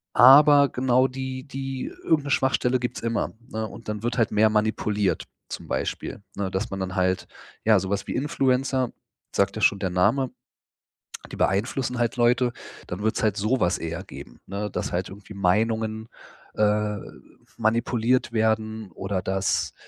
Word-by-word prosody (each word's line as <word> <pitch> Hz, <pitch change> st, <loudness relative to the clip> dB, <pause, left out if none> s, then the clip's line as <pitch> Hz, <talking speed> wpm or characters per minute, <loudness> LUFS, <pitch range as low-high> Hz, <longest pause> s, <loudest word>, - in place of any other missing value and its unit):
Aber 140 Hz, +3 st, +8 dB
genau 130 Hz, 0 st, +2 dB
die 130 Hz, 0 st, -5 dB
die 135 Hz, -2 st, -5 dB, 0.2 s
irgend 155 Hz, -3 st, +2 dB
'ne 140 Hz, -, -4 dB
Schwachstelle 130 Hz, -1 st, +2 dB
gibt's 125 Hz, 0 st, -4 dB
immer, 115 Hz, 0 st, -1 dB, 0.2 s
ne? 110 Hz, 0 st, -3 dB
Und 115 Hz, -, -11 dB
dann 105 Hz, 0 st, -3 dB
wird 120 Hz, +2 st, -2 dB
halt 115 Hz, -, +3 dB
mehr 110 Hz, +1 st, +4 dB
manipuliert. 105 Hz, -2 st, 0 dB, 0.3 s
Zum -, -, -6 dB
Beispiel, -, -, -3 dB
ne, 100 Hz, -2 st, -2 dB
dass 95 Hz, +3 st, -2 dB
man 95 Hz, -, -4 dB
dann 95 Hz, -1 st, -3 dB
halt 95 Hz, -1 st, 0 dB, 0.4 s
ja, 110 Hz, -3 st, +5 dB
sowas 95 Hz, +2 st, -2 dB
wie -, -, -4 dB
Influencer, 130 Hz, -3 st, +1 dB, 0.4 s
sagt 100 Hz, +1 st, +1 dB
ja 110 Hz, -, -4 dB
schon 100 Hz, -, +4 dB
der 95 Hz, -, -1 dB
Name, 105 Hz, +9 st, +2 dB, 1.0 s
die -, -, -7 dB
beeinflussen 120 Hz, +5 st, 0 dB
halt 120 Hz, 0 st, 0 dB
Leute. 120 Hz, +1 st, +3 dB, 0.4 s
Dann 90 Hz, +3 st, -5 dB
wird's 110 Hz, +1 st, 0 dB
halt 105 Hz, -2 st, +1 dB
sowas 105 Hz, -3 st, +1 dB
eher 85 Hz, 0 st, -5 dB
geben, -, -, -11 dB
ne, 100 Hz, +2 st, -4 dB
dass -, -, -3 dB
halt -, -, -1 dB
irgendwie 100 Hz, +2 st, -11 dB
Meinungen, 110 Hz, +3 st, 0 dB, 0.5 s
äh, 105 Hz, 0 st, +1 dB, 0.6 s
manipuliert 115 Hz, +2 st, +1 dB
werden 110 Hz, -2 st, 0 dB
oder 95 Hz, +2 st, -3 dB
dass 95 Hz, +1 st, 0 dB
110 Hz, 155 wpm, -25 LUFS, 100-125 Hz, 1.0 s, Aber